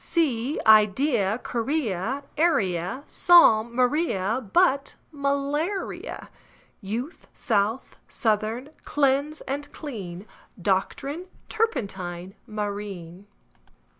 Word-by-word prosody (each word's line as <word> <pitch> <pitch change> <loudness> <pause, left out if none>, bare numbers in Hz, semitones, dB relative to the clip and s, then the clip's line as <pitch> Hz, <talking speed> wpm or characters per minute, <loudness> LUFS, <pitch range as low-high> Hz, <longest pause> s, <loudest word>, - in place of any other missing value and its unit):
Sea, 280 -4 0
idea, 215 0 +4
guinea, 245 - -1
area, 220 - +1
Psalm; 235 -10 +5
Maria, 250 - +1
but 280 -6 +3 0.2
malaria; 285 +6 -2 0.5
Youth, 235 - -5
south, 220 +2 -1
southern; 225 +4 -1
cleanse 285 +2 +1
and 285 +2 -5
clean; 200 - -7 0.3
Doctrine, 275 - -1 0.2
turpentine, 195 - -2
marine. 205 -3 -5
240 Hz, 75 wpm, -25 LUFS, 200-285 Hz, 0.5 s, Psalm